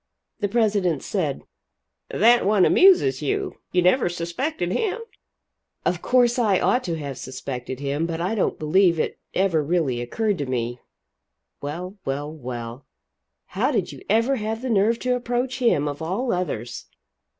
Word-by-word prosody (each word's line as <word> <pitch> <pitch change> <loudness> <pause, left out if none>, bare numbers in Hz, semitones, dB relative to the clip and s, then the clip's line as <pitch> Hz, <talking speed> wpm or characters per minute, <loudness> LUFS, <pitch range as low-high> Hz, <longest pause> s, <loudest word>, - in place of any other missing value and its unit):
The 205 - 0
president 200 - +1
said: - - -2 0.7
"That 235 +3 +4
one 200 -2 +4
amuses 255 - +5
you. 145 - -2
You 180 -1 +2
never 180 +3 +3
suspected 175 - -3
him?" 435 - -1 0.9
"Of 175 0 0
course 245 -1 +3
I 205 -6 +3
ought 250 +1 +2
to 170 -2 -2
have 140 -4 -6
suspected 130 0 -6
him, 145 +3 -1
but 165 -1 -4
I 180 +5 -1
don't 215 - 0
believe 170 +2 +3
it - - -2 0.2
ever 180 -5 +2
really 145 -6 0
occurred 205 - -1
to 140 - -2
me. 120 -1 -2 0.8
Well, 180 +7 -6
well, 145 +3 -3
well 120 -3 -7 0.6
how - - 0
did - - -1
you - - -11
ever 230 +6 +3
have 220 +2 -3
the 255 - -1
nerve 220 +2 +3
to 250 0 +1
approach 245 +1 -2
him, 230 - +2
of 145 +1 -5
all 200 +10 -1
others?" 125 -10 -3
180 Hz, 155 wpm, -23 LUFS, 145-225 Hz, 0.9 s, amuses